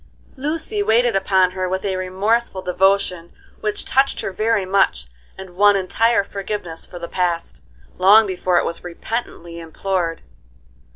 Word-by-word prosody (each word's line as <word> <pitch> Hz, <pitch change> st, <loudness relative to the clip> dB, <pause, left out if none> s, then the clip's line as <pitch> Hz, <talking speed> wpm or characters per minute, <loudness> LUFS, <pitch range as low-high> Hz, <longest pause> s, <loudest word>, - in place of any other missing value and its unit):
Lucy 320 Hz, +9 st, -2 dB
waited 240 Hz, -, +2 dB
upon 190 Hz, -1 st, +2 dB
her 185 Hz, 0 st, -3 dB
with 190 Hz, +1 st, -3 dB
a 195 Hz, -1 st, -1 dB
remorseful 190 Hz, +2 st, -1 dB
devotion 180 Hz, -1 st, +1 dB, 0.3 s
which 210 Hz, -1 st, -1 dB
touched 270 Hz, +1 st, +1 dB
her -, -, -4 dB
very 215 Hz, 0 st, 0 dB
much 185 Hz, -, +1 dB, 0.3 s
and 190 Hz, -1 st, -10 dB
won 205 Hz, +1 st, +5 dB
entire 210 Hz, +4 st, +2 dB
forgiveness 195 Hz, -4 st, -6 dB
for 180 Hz, -, -10 dB
the 170 Hz, -1 st, -6 dB
past, 170 Hz, -, -2 dB, 0.4 s
long 205 Hz, +4 st, +7 dB
before 185 Hz, -2 st, 0 dB
it -, -, +2 dB
was 170 Hz, -, -4 dB
repentantly 175 Hz, -2 st, -6 dB
implored. 170 Hz, +1 st, -3 dB
190 Hz, 140 wpm, -20 LUFS, 180-215 Hz, 0.4 s, long